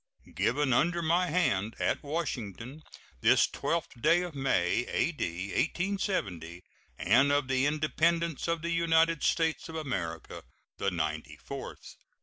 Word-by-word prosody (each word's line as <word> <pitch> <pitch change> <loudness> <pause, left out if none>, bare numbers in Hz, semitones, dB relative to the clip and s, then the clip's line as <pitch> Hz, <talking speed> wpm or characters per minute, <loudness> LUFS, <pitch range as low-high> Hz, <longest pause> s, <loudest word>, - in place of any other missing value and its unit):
[SEAL.] - - -18
Given 135 +1 +1
under 170 +7 +2
my 175 +3 +2
hand, 115 - 0
at - - 0
Washington, 135 - -4 0.4
this - - +5
12th 165 -7 -3
day 175 +7 +4
of 175 -3 -6
May, 120 -7 +1
A.D. 95 - -1
1870, 130 - -2 0.3
and 135 +7 +4
of 145 -2 +1
the 130 +1 +2
Independence 160 +2 0
of 165 -1 -1
the 170 - -1
United 165 -1 +3
States 160 -2 0
of 160 - -7
America 95 - -4 0.4
the 100 - +1
ninety 80 -3 -3
fourth. - - -9
145 Hz, 135 wpm, -30 LUFS, 100-165 Hz, 0.4 s, this